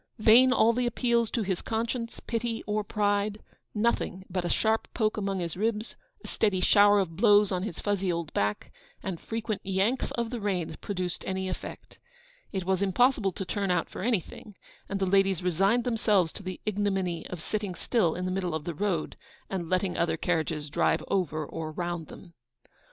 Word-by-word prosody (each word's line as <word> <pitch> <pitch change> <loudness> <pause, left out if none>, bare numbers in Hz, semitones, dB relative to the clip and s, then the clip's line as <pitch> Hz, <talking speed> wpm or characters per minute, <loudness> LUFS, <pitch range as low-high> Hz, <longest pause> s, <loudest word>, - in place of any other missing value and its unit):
Vain 235 +4 +7
all 230 -2 +4
the 245 +1 0
appeals 235 -1 +1
to 230 - -1
his 190 -3 -2
conscience, 230 +1 -3
pity, 230 0 -2
or 210 0 0
pride: 205 0 0 0.3
nothing 210 -4 0
but 180 -1 -1
a 175 - -2
sharp 220 +4 +1
poke 215 -2 +1
among 195 -2 -2
his 170 -2 -3
ribs, 215 +3 -1 0.3
a - - -6
steady 205 -4 +1
shower 205 +2 +6
of 170 -4 -2
blows 205 +1 +5
on 180 -1 0
his 215 - -4
fuzzy 195 -3 0
old 170 -2 -3
back, 105 +1 -1 0.3
and 185 -4 -4
frequent 225 -2 -3
'yanks' 195 +6 0
of 235 -1 -2
the 245 - -3
reins 180 -6 -1
produced 180 -3 -4
any 190 0 -2
effect. 185 - -7 0.5
It 190 -2 -3
was 190 0 +1
impossible 200 +1 +3
to 190 - -5
turn 200 0 -2
out 180 -2 +1
for - - -6
anything, 210 -1 -2 0.3
and 200 - -2
the 195 - +1
ladies 195 -1 +3
resigned 195 +7 +2
themselves 210 -8 +2
to - - -9
the 185 -2 -6
ignominy 195 -5 -1
of 180 - -6
sitting 205 +2 -3
still, 175 -3 +1
in 180 - -3
the 185 - -1
middle 180 -3 -1
of 160 - -3
the 170 - -4
road, 175 -1 -1 0.4
and 175 -4 -3
letting 185 0 0
other 165 -1 +1
carriages 155 -3 -1
drive - - +2
over 155 -5 0
or 160 +1 -5
round 175 -1 -3
them. 175 -3 -13
195 Hz, 185 wpm, -28 LUFS, 180-215 Hz, 0.5 s, Vain